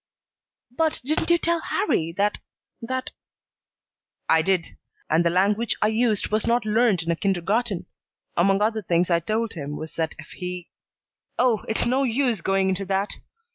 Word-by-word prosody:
"But 315 +5 0
didn't 310 +5 +1
you 340 - +5
tell 335 0 0
Harrie 165 - 0
that 205 +3 0 0.4
that 260 +2 -3 0.6
" - - -56
"I 160 - +4
did. 180 0 -1 0.4
And 160 +2 +4
the 170 - +3
language 205 +6 +1
I 215 - +3
used 220 -2 +1
was 215 +1 0
not 235 -1 +2
learned 215 -4 +2
in 165 - -1
a - - +1
kindergarten. 195 +4 0 0.5
Among 195 +3 +3
other 220 0 0
things 175 -1 +1
I 170 - +4
told 215 +6 -2
him 145 -2 -5
was 160 0 -7
that 160 -1 -1
if 155 - -12
he 180 -1 -6 0.7
Oh, 245 -4 +2
it's 220 - +2
no 255 +3 +2
use 245 -4 +1
going 195 +1 +1
into 190 +1 -1
that. 195 +1 -1
205 Hz, 170 wpm, -24 LUFS, 175-235 Hz, 0.7 s, you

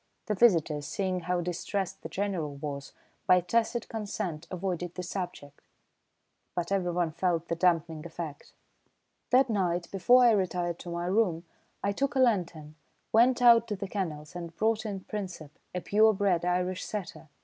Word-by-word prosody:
The 215 - 0
visitors, 165 -9 +3
seeing 185 -2 -1
how 180 0 -1
distressed 185 +2 -3
the - - -7
General 185 -8 -2
was, 140 -1 -6 0.4
by 180 - +7
tacit 230 +6 0
consent 200 -7 -4
avoided 180 -2 -3
the 180 - -4
subject, 175 -6 -6 0.9
but 175 +1 -2
everyone 175 -3 0
felt 170 0 -1
the 170 - 0
dampening 165 -3 +1
effect. 165 -3 -7 0.8
That 260 +2 +5
night, 180 -6 -1
before 245 +6 +5
I 235 - +7
retired 180 -4 0
to 175 - -8
my 170 0 -3
room, 180 -3 +1 0.4
I 200 - +1
took 275 +7 -1
a - - +2
lantern, 175 -11 +1 0.4
went 245 +2 +5
out 235 -1 +7
to 210 - -2
the 195 0 -5
kennels 170 -5 -4
and 170 -1 -7
brought 220 +2 +1
in 195 -2 -4
Princep, 180 -8 -6 0.2
a 180 - -1
pure 215 +3 +4
bred 190 -4 +1
Irish 180 +1 0
setter. 175 -6 -6
180 Hz, 160 wpm, -29 LUFS, 170-205 Hz, 0.9 s, by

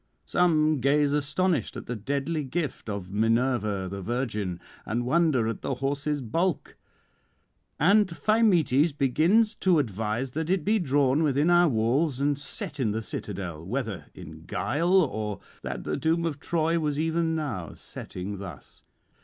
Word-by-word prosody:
Some 155 -4 +3
gaze 140 +2 +3
astonished 150 - 0
at - - -7
the 125 - -4
deadly 140 +7 -2
gift 140 -3 -4
of 100 -2 -5
Minerva 110 -3 +1
the 100 +1 -6
Virgin, 105 -5 -2 0.2
and 120 +2 -2
wonder 145 -5 +2
at 115 - -3
the 135 - -2
horse's 145 +2 -1
bulk; 165 +8 -1 1.0
and 200 +7 +5
Thymoetes 170 - +3
begins 170 - +3
to 185 -3 +3
advise 115 0 -1
that 160 +4 -3
it 185 -4 +1
be 220 +1 +3
drawn 140 -3 +2
within 150 +2 +2
our 175 -1 +5
walls 130 +5 +1
and 145 +1 +2
set 150 +1 -5
in 110 -6 +1
the 110 +1 -3
citadel, 90 -8 -5
whether 110 +1 -4
in 80 -2 -11
guile, 170 - +2
or 110 - -3 0.2
that - - -5
the - - -2
doom 165 +1 +1
of 155 -3 -3
Troy 165 +2 0
was 150 -2 -1
even 165 0 0
now 125 - -4
setting 95 +2 -7
thus. 90 -9 -10
140 Hz, 150 wpm, -27 LUFS, 110-165 Hz, 1.0 s, and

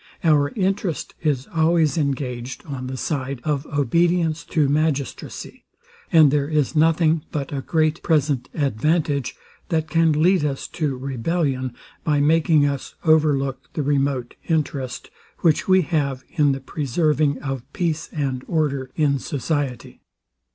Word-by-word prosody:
Our 150 -3 +4
interest 195 -4 -1
is 140 -5 0
always 160 -1 +3
engaged 130 -5 -3
on 135 -4 -5
the 130 0 -5
side 135 -2 -3
of 150 -1 -1
obedience 165 +3 +1
to 160 -4 +1
magistracy; 145 -2 -2 0.5
and 155 -4 +7
there 145 -1 +1
is 150 -1 0
nothing 160 0 +3
but 145 -1 -3
a 135 - -2
great 155 +2 0
present 145 -5 +1
advantage, 145 0 0 0.3
that 160 -2 0
can 165 0 +3
lead 165 +3 +3
us 140 -2 -2
to 150 -6 -2
rebellion, 130 0 -2 0.3
by 150 -2 +2
making 155 0 +4
us 140 -2 -3
over 155 -2 +4
look 135 -1 -5
the 150 - -1
remote 135 -3 0
interest, 140 -5 -2 0.3
which 160 -3 +2
we 185 -1 +5
have 140 -5 -1
in 150 -4 +3
the 135 0 -3
preserving 150 +1 0
of 135 -3 -4
peace 165 -4 -2
and 135 -4 -2
order 140 -5 -1
in 145 -3 +2
society. 145 -2 -3
150 Hz, 135 wpm, -22 LUFS, 135-160 Hz, 0.5 s, and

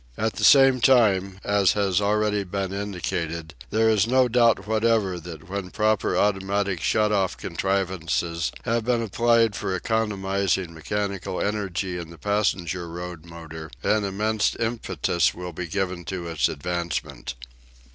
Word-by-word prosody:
At 110 0 0
the - - -5
same 135 -2 +7
time, 100 -7 +3
as 100 -2 +3
has 100 -1 +1
already 105 0 +1
been 95 0 -3
indicated, 90 -5 -4 0.2
there 110 +2 +2
is 110 -2 +3
no 130 +1 +4
doubt 115 -4 +3
whatever 110 -4 +1
that 85 -1 -10
when 95 -1 -4
proper 110 +1 +1
automatic 100 -2 0
shut 105 +3 +2
off 95 -3 +1
contrivances 90 -4 -1
have 115 0 0
been 120 0 +1
applied 115 0 +2
for 95 - -2
economising 95 -4 -1
mechanical 100 +3 -3
energy 95 -3 -2
in 85 -2 -7
the 85 - -12
passenger 90 -4 -1
road 85 -1 -7
motor, 80 -1 -9
an 105 0 +2
immense 105 +2 0
impetus 115 -7 0
will 90 0 -6
be 90 +2 -5
given 90 0 -2
to 90 -2 -4
its 80 -5 +1
advancement. 85 -1 -4
100 Hz, 140 wpm, -24 LUFS, 90-105 Hz, 0.2 s, same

